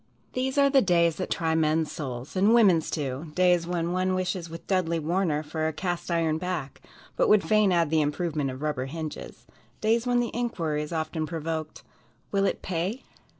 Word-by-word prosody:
These 260 +2 -1
are 280 0 +6
the 270 -1 +6
days 170 -4 +3
that 185 - -3
try 160 -1 0
men's 160 0 +1
souls, 130 0 -6
and 200 +5 +4
women's, 190 -9 +4
too; 145 +1 -4
days 180 -2 +3
when 175 -1 -1
one 185 +1 +1
wishes 185 -2 -2
with 165 +1 -9
Dudley 180 -4 +1
Warner 160 -1 0
for 155 +1 -2
a 160 - -2
"cast 175 +3 -3
iron 165 -2 +1
back," 170 -6 -4 0.3
but - - +2
would 210 -1 +5
fain 215 -2 +3
add 170 -3 +2
the 160 -1 +3
improvement 150 -1 -1
of 130 +3 -7
rubber 145 -4 -1
hinges; 155 +1 -7 0.3
days 225 +3 +1
when 245 0 +3
the 240 -1 -1
inquiry 165 -11 -1
is 150 - -6
often 160 -1 -2
provoked, 160 -1 -4 0.5
"Will 195 -1 +2
it - - -3
pay?" 185 +8 -2
170 Hz, 190 wpm, -27 LUFS, 155-185 Hz, 0.5 s, are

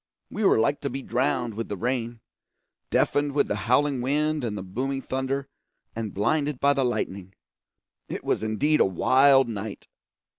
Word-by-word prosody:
We 215 - -3
were 195 - +5
like 115 +6 +1
to 140 - -2
be 135 0 -5
drowned 125 -2 0
with 115 +2 -5
the 100 - -3
rain, 120 +1 -2 0.7
deafened 145 0 +1
with 145 - +2
the - - -1
howling 140 0 +3
wind 150 +3 0
and 105 -3 -3
the 95 - -5
booming 135 +8 -3
thunder, 135 +1 -2 0.5
and 110 -2 -4
blinded 145 +7 0
by 140 0 +4
the 135 -1 0
lightning. 95 -6 -3 0.7
It - - -5
was - - 0
indeed 120 +8 +1
a - - +5
wild 135 +8 +4
night. 110 -2 -6
130 Hz, 170 wpm, -25 LUFS, 110-140 Hz, 0.7 s, were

